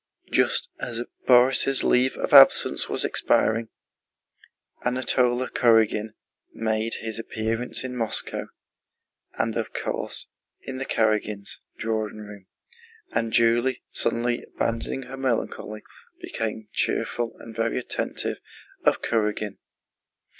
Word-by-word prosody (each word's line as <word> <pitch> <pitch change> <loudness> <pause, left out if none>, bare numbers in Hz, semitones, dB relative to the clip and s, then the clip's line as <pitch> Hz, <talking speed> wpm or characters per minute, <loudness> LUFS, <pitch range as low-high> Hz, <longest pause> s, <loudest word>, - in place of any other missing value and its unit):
Just - - +2
as 120 -1 -3 0.2
Borís' 130 +2 +6
leave 125 +1 +3
of - - -3
absence - - +7
was - - 0
expiring, 115 0 +1 1.1
Anatole 125 0 +1
Kurágin 110 -2 +3 0.4
made 110 0 -1
his 110 0 -4
appearance 115 +2 -3
in 130 -1 -5
Moscow, 115 -3 -2 0.9
and - - 0
of - - -3
course - - -3 0.4
in 130 -1 -6
the 135 - -4
Karágins' 105 -2 0 0.2
drawing 110 -1 -2
room, 105 -2 -11 0.6
and 115 -1 -1
Julie, 120 +3 +2
suddenly 120 +1 0
abandoning 115 +3 -3
her 130 +1 -9
melancholy, 115 -4 -2 0.4
became 110 -1 -4
cheerful 120 -1 -1
and 115 -1 -11
very 115 +1 0
attentive 125 - -2 0.5
to - - +7
Kurágin. 105 -2 -2
115 Hz, 105 wpm, -25 LUFS, 110-125 Hz, 1.1 s, absence